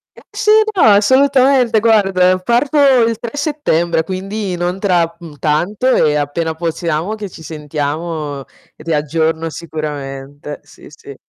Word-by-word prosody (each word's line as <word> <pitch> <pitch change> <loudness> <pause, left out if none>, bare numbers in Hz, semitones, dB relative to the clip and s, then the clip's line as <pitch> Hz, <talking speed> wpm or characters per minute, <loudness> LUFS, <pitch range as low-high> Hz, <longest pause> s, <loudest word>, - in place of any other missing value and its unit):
Eh, - - -15
sì, 425 - +1 0.2
no, 370 - +3
assolutamente 260 +1 +4
guarda 195 -5 +3
parto 240 +9 0 0.3
il 230 -1 -1
3 235 +2 -6
settembre 175 - 0
quindi, 190 +1 -4
non 175 +2 -2
tra, 175 -4 +1
mhmm, 165 -4 -11
tanto 175 - -1
e 150 -1 +2
appena 150 +3 -2
possiamo 165 +3 -2
che 210 -2 -7
ci 165 - -13
sentiamo, 150 -1 -4 0.3
ti 160 +1 -4
aggiorno 160 +2 -1
sicuramente. 145 -3 -7
Sì, - - -17
sì. 140 -1 -12
170 Hz, 135 wpm, -16 LUFS, 155-210 Hz, 0.3 s, assolutamente